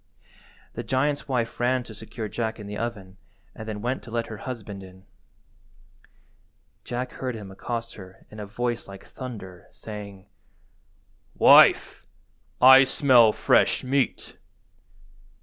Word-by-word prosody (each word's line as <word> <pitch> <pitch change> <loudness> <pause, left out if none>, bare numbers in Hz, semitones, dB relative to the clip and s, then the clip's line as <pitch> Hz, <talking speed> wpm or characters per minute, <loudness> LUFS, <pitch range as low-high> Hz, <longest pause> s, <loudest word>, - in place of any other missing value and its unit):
The - - -5
giant's 145 +3 -1
wife 120 -4 -2
ran 125 +1 +1
to 115 - -12
secure 110 +1 -7
Jack 110 +1 -4
in 105 - -8
the 105 0 -7
oven 100 -4 -6 0.4
and 110 - -10
then 105 0 -6
went 125 +2 -2
to - - -13
let 115 0 -2
her - - -7
husband 105 -5 -7
in. 95 0 -15 1.8
Jack 125 +1 -4
heard 130 -2 -5
him 100 -3 -9
accost 115 +4 -5
her 95 -2 -14
in 105 - -11
a 105 - -6
voice 120 +2 -3
like 95 -1 -12
thunder, 100 -9 -10
saying— 100 -3 -10 1.1
"Wife, - - +5 0.5
I 130 +1 +9
smell 130 -4 +5
fresh - - +2
meat." 135 0 -2
115 Hz, 130 wpm, -25 LUFS, 100-125 Hz, 1.8 s, I